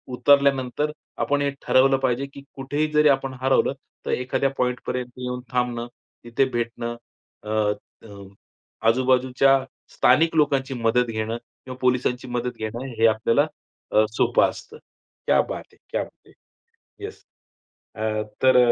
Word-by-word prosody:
उतरल्यानंतर 140 +1 +3 0.3
आपण 145 0 +1
हे 140 - +1
ठरवलं 135 +1 +4
पाहिजे 130 0 0
की 140 - -10
कुठेही 145 +3 -1
जरी 150 0 +5
आपण 135 -1 +1
हरवलं, 135 +1 +3 0.3
तर - - -2
एखाद्या 130 +2 0
पॉइंट 125 0 0
पर्यंत 125 -1 -2
येऊन 125 0 -4
थांबणं, 125 -1 -1 0.4
तिथे 120 +3 +1
भेटणं, 120 -1 -3 0.5
अ, 105 -1 +1 0.3
त - - -14 0.8
आजूबाजूच्या 130 +2 +3 0.3
स्थानिक 160 +6 +4
लोकांची 140 -3 +2
मदत 120 0 +2
घेणं, 110 +1 -2 0.3
किंवा 130 -1 -8
पोलिसांची 125 0 +1
मदत 125 0 -3
घेणं, 115 +4 -5
हे 115 - +6
आपल्याला 115 +7 +2 0.4
अ, 110 - +5
सोपं - - +3
असतं. - - -11 0.5
क्या - - +5
बात - - -4
है, - - -23
क्या - - -1
बात - - -18
है! - - -19 0.7
येस. 415 +2 -8 0.7
अ, 110 - -7 0.4
तर 130 -1 +6
125 Hz, 140 wpm, -24 LUFS, 120-135 Hz, 0.8 s, हे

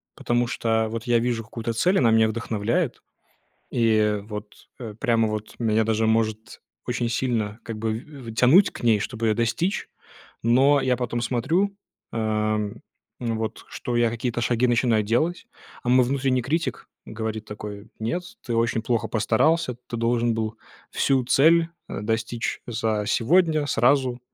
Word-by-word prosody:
потому 120 0 0
что 110 -1 0
вот 115 0 -4
я 120 -2 +3
вижу 115 -1 -1
какую-то 115 +1 -4
цель, 180 - +2
она 115 -3 +4
меня 110 0 +5
вдохновляет, 110 -1 -1 0.7
и 110 -3 +2
вот, 105 0 -9
э, 110 -4 -7
прямо 115 -2 +2
вот 110 0 -5
меня 110 -1 +2
даже 110 0 +1
может 110 -1 -1 0.3
очень 120 -1 -1
сильно 115 -3 -1
как 115 -1 -6
бы 110 0 -1
в 140 0 -12
в - - -10
тянуть 130 - +5
к - - -10
ней, 115 -3 +4
чтобы 115 +2 -2
ее 110 - +3
достичь. 120 - -1 0.6
Но 135 +5 +4
я 130 -1 +1
потом 120 -1 -2
смотрю, 165 - 0 0.4
а, 110 -1 0 0.6
ну 115 -2 -2
вот, 110 0 -4
что 120 - -4
я 120 -1 +3
какие-то 120 +1 -3
шаги 120 +1 +2
начинаю 115 -2 +2
делать, 160 - 0 0.4
а 120 - -1
мой 125 +1 +6
внутренний 130 -1 +1
критик 160 +7 -2 0.2
говорит 110 -1 -4
такой: 105 0 -8
"Нет, 115 +11 -2 0.2
ты 120 - -2
очень 115 -1 +1
плохо 115 -1 0
постарался, 120 +5 +2
ты 120 - -5
должен 115 0 +1
был 110 0 -3 0.3
всю 135 -2 +2
цель, 165 +6 +4 0.2
э, - - -5
достичь 115 +2 -2
за 110 -3 -1
сегодня, 155 - +2
сразу, 125 0 +2
115 Hz, 160 wpm, -24 LUFS, 110-125 Hz, 0.7 s, мой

